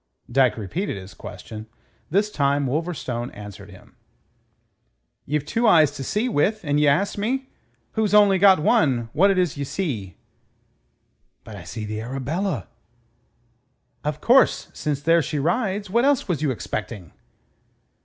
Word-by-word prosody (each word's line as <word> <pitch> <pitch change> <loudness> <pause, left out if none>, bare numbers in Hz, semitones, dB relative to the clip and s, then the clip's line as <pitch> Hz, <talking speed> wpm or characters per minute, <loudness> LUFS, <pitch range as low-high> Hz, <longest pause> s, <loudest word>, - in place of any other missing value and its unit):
Dyke 130 -3 +3
repeated 115 - -3
his 95 0 -10
question. 110 0 -9 0.4
This 205 +5 +1
time 140 -3 +1
Wolverstone 135 -4 -3
answered 100 -1 -10
him. 95 - -16 1.3
"Ye've 150 0 -1
two 230 +8 +1
eyes 155 -8 +6
to 140 - -7
see 210 - -1
with, 215 +1 +1
and 145 -2 +1
ye 150 - +3
ask 190 +9 +1
me, 260 +5 -2 0.4
who's 220 -2 0
only 200 -2 +6
got 195 0 +7
one, 130 -6 +2
what 185 +7 +4
it 195 - +2
is 180 -6 0
ye 140 - -2
see!" 125 - -4 1.3
"But 110 - -10
I 90 -5 -10
see 110 +6 -6
the 110 +1 -4
Arabella." 135 - -3 1.4
"Of 150 0 -3
course, 255 +3 +4
since 145 -2 -3
there 165 +2 +4
she 150 +1 -3
rides. 195 - -1
What 235 +6 +1
else 280 -1 +2
was 170 -7 -1
you 150 - +1
expecting?" 110 - -5
150 Hz, 145 wpm, -23 LUFS, 120-195 Hz, 1.4 s, got